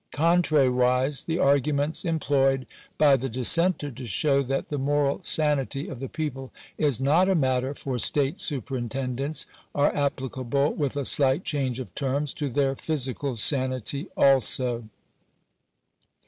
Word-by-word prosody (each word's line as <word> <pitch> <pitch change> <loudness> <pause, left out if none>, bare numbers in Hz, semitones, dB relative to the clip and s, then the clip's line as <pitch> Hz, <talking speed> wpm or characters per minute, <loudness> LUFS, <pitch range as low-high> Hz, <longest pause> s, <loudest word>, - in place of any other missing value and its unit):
Contrariwise, 140 -4 +2
the 165 0 -1
arguments 145 +1 +1
em 165 -1 0
ployed 135 -2 +1 0.3
by 145 -2 +5
the 135 +1 -3
dissenter 145 +6 +2
to 125 0 -8
show 140 - +2
that 135 0 -3
the 145 - -3
moral 145 +3 0
sanity 145 -3 -1
of 125 - -7
the 135 -1 -5
people 135 -5 -5 0.2
is 145 -6 +1
not 155 +8 +3
a 190 - +3
matter 130 -2 0
for 130 -3 -4
state 145 - +1
superintendence, 135 - -3 0.3
are 145 0 +2
applicable, 140 0 -1
with 145 -2 -2
a 140 - -2
slight 135 +6 +3
change 135 -5 -2
of 130 - -7
terms, 140 +1 -2
to 145 -2 -3
their 135 +1 0
physical 135 -3 -2
sanity 130 - 0
also. 125 -3 +2
140 Hz, 135 wpm, -25 LUFS, 130-145 Hz, 0.3 s, by